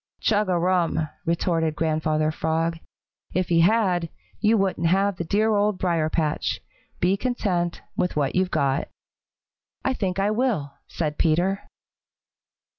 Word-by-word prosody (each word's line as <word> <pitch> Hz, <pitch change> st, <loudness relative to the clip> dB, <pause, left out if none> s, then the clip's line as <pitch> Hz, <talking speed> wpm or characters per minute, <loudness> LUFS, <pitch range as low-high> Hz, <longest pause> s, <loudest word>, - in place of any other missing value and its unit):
"Chug 210 Hz, -2 st, +1 dB
a 180 Hz, -, +2 dB
rum!" 170 Hz, -3 st, +1 dB, 0.2 s
retorted 165 Hz, -2 st, +1 dB
Grandfather 155 Hz, -1 st, +1 dB
Frog. 165 Hz, +1 st, -1 dB, 0.6 s
"If 185 Hz, 0 st, 0 dB
he 170 Hz, -1 st, +4 dB
had, 180 Hz, -2 st, +3 dB, 0.3 s
you 220 Hz, +1 st, +3 dB
wouldn't 190 Hz, -4 st, +1 dB
have 195 Hz, +2 st, +2 dB
the -, -, -2 dB
dear 215 Hz, +6 st, +2 dB
Old 205 Hz, -1 st, +2 dB
Briar 170 Hz, -4 st, +1 dB
patch. 155 Hz, -2 st, -1 dB, 0.4 s
Be 180 Hz, +2 st, +3 dB
content 195 Hz, -7 st, -1 dB
with 180 Hz, -, -1 dB
what 145 Hz, -3 st, 0 dB
you've 185 Hz, 0 st, +1 dB
got," 140 Hz, -4 st, 0 dB, 1.0 s
"I 265 Hz, -, +2 dB
think 190 Hz, -6 st, -2 dB
I 200 Hz, +2 st, +2 dB
will," 215 Hz, -, 0 dB
said 150 Hz, -3 st, -3 dB
Peter. 175 Hz, +5 st, +1 dB
175 Hz, 135 wpm, -24 LUFS, 160-195 Hz, 1.0 s, he